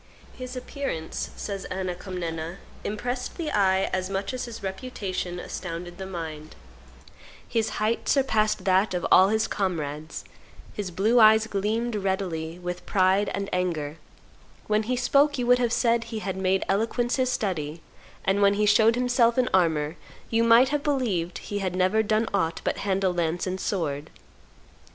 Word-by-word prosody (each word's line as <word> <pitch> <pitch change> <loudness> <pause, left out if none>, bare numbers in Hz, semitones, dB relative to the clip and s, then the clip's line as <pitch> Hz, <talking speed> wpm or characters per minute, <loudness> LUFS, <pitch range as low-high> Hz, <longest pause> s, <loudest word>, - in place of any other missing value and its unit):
"His 255 0 -7
appearance," 250 - -4
says 200 -2 -5
Anna 185 -1 -3
Comnena, 170 -2 -5 0.3
"impressed 245 +4 -4
the 325 -4 -3
eye 190 -2 +3
as 185 0 -1
much 195 +4 -2
as 255 - -3
his 230 -3 -9
reputation 190 -3 -4
astounded 175 0 -6
the 190 - -5
mind; 160 -4 -7 0.9
his 225 -2 0
height 215 +2 0
surpassed 220 -8 +2
that 190 +1 +3
of 175 - -2
all 185 - +8
his 220 +1 +1
comrades; 155 -5 -3 0.5
his 205 -3 -4
blue 215 +7 +2
eyes 220 0 +7
gleamed 220 +3 -1
readily 185 -5 -2
with 180 0 -5
pride 190 +1 +3
and 200 0 -3
anger; 165 -5 -1 0.7
when 215 0 +2
he 250 - +2
spoke 280 +4 +3
you 245 - -1
would 250 +1 +5
have 240 -2 +1
said 230 -1 +2
he 225 -1 -5
had 195 -3 -3
made 190 0 +1
eloquence 230 +5 0
his 255 -1 +1
study; 165 -8 -2 0.5
and 195 +1 +2
when 200 0 +5
he 210 +1 +2
showed 220 +2 +5
himself 245 -1 +2
in 255 -1 +3
armor, 160 -3 +2 0.3
you 230 0 +3
might 230 +3 +6
have 295 0 0
believed 230 - -1
that - - -7
he 205 - -2
had 185 -2 -2
never 185 +4 +3
done 220 +1 +1
aught 165 -4 0
but - - -1
handle 190 -2 0
lance 170 0 -1
and 185 0 -3
sword. 155 -8 -2
195 Hz, 165 wpm, -26 LUFS, 180-230 Hz, 0.9 s, all